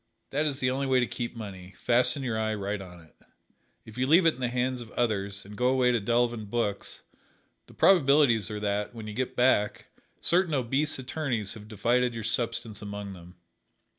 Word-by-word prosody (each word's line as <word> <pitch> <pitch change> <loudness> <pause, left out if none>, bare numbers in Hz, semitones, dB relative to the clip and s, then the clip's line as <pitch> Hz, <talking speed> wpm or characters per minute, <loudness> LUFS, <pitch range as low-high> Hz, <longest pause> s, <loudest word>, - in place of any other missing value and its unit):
That 150 +3 +1
is 140 -2 -1
the 125 0 +1
only 135 +1 -1
way 130 -1 +3
to 125 - +2
keep 120 0 -5
money 95 -4 -9
fasten 125 +3 +2
your 120 -4 -1
eye 110 0 0
right 100 0 -3
on 90 -2 -11
it. 80 - -21 0.7
If 110 +2 -10
you 130 - +1
leave 165 +5 +6
it 165 - +5
in - - -15
the 125 - 0
hands 125 +1 -1
of 115 - -10
others, 100 -4 -1
and 105 +1 -10
go 125 +3 +1
away 130 -1 +3
to 120 - +2
delve 120 +3 +1
in 110 -2 -6
books, 105 -2 -3 0.6
the - - -17
probabilities 140 - +4
are 105 -1 -4
that, 105 +2 -2
when 110 -2 -7
you 105 - -6
get 130 +3 -3
back, 120 -5 +2 0.3
certain 175 -3 +3
obese 135 +4 0
attorneys 125 -6 -2
have 105 -2 -11
divided 120 +3 +1
your 115 - -5
substance 115 -2 -2
among 100 -1 -6
them. 90 0 -13
120 Hz, 200 wpm, -28 LUFS, 105-130 Hz, 0.7 s, leave